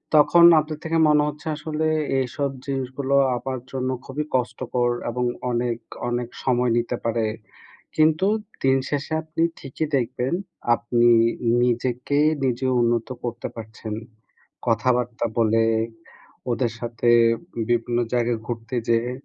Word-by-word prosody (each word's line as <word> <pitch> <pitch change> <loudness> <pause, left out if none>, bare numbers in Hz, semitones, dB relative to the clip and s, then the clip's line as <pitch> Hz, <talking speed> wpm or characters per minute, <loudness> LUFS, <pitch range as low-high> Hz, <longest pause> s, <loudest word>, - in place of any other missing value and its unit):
তখন 160 +3 +6 0.2
আপনার 155 0 -4
থেকে 165 0 0
মনে 150 -1 +5
হচ্ছে 150 +1 -6
আসলে 155 +1 -2 0.3
এইসব 135 +2 -1 0.2
জিনিসগুলো 135 0 -2 0.2
আমার 130 +1 -4
জন্য 130 -1 -2 0.2
খুবই 145 +3 -3
কষ্টকর, 125 -1 0 0.2
এবং 125 +1 -2 0.3
অনেক, 120 -1 0 0.3
অনেক 120 0 -2 0.2
সময় 125 -1 +2
নিতে 120 +1 -1
পারে। 115 -1 +1 0.7
কিন্তু 155 +4 +4 0.4
দিন 135 0 +4
শেষে 145 +2 -2
আপনি 160 +1 -4 0.2
ঠিকই 145 +3 -4
দেখবেন 125 +1 -1 0.4
আপনি 120 0 +2 0.5
নিজেকে 125 +3 0 0.3
নিজে 130 +1 0
উন্নত 120 -1 +1 0.2
করতে 120 -2 -4
পারছেন। 110 -1 -7 0.7
কথাবার্তা 120 +1 +1
বলে, 115 0 +3 0.9
ওদের 120 0 0
সাথে 120 0 -1 0.6
বিভিন্ন 120 0 +1 0.2
জায়গায় 120 -1 +1
ঘুরতে 115 0 -5
যেয়ে। 115 +1 +2
125 Hz, 120 wpm, -23 LUFS, 120-140 Hz, 0.9 s, তখন